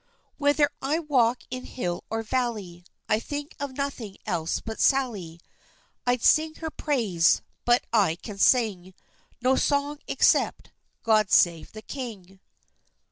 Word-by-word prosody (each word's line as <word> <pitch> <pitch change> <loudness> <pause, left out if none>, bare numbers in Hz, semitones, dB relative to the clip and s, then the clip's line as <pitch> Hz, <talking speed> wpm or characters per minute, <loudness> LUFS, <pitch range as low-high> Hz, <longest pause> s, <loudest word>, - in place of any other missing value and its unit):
Whether 290 0 +3
I 285 +4 0
walk 255 -7 +1
in 255 0 -5
hill 175 -8 -4
or 225 +1 -2
valley, 215 -8 -3 0.2
I 215 - +2
think 290 +4 -6
of 280 -2 -5
nothing 260 -8 -4
else 165 0 -1
but 220 -1 -7
Sally. 210 - +1 0.7
I'd 245 -1 +1
sing 315 0 +4
her 320 -1 -5
praise, 215 - +1 0.2
but 240 +1 +3
I 195 -8 +3
can 200 +3 -9
sing 195 -7 +2 0.5
No 260 +1 +4
song, 285 +1 0
except - - +2 0.3
"God 215 -3 +3
save 170 -2 +3
the 215 0 -9
king!" 205 -9 -8
235 Hz, 135 wpm, -26 LUFS, 195-280 Hz, 0.7 s, sing